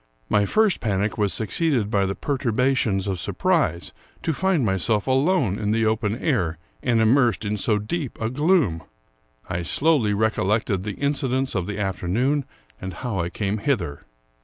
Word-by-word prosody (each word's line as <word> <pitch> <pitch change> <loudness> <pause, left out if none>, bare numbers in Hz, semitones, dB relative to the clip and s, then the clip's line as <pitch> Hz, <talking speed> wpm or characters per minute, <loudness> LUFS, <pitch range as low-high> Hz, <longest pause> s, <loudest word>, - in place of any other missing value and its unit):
My 105 -1 +3
first 215 - +2
panic 105 0 -1
was 100 -2 +2
succeeded 115 - 0
by 100 -3 +2
the 95 - -2
perturba 130 -1 0
tions 100 -6 0
of 95 -3 -2
surprise 85 +1 0 0.3
to 160 - 0
find 185 -5 +1
myself 100 +2 +1
alone 135 - +2
in 105 - -1
the 110 +1 +2
open 110 0 0
air 95 - 0 0.2
and 120 -3 +2
immersed 115 -1 +3
in 105 +1 -1
so 105 +1 +1
deep 130 +7 -4
a 110 +1 -2
gloom. 145 - +2 0.7
I 85 - -2
slowly 120 - +2
recollected 110 -1 +1
the 105 0 -6
in 140 +1 +1
cidents 135 -1 -1
of 95 -3 -2
the 105 -1 -4
afternoon, 105 - 0 0.4
and 95 -2 -5
how 115 -3 -3
I 85 0 -1
came 105 +2 -2
hither. 95 - -1
110 Hz, 165 wpm, -23 LUFS, 100-135 Hz, 0.7 s, My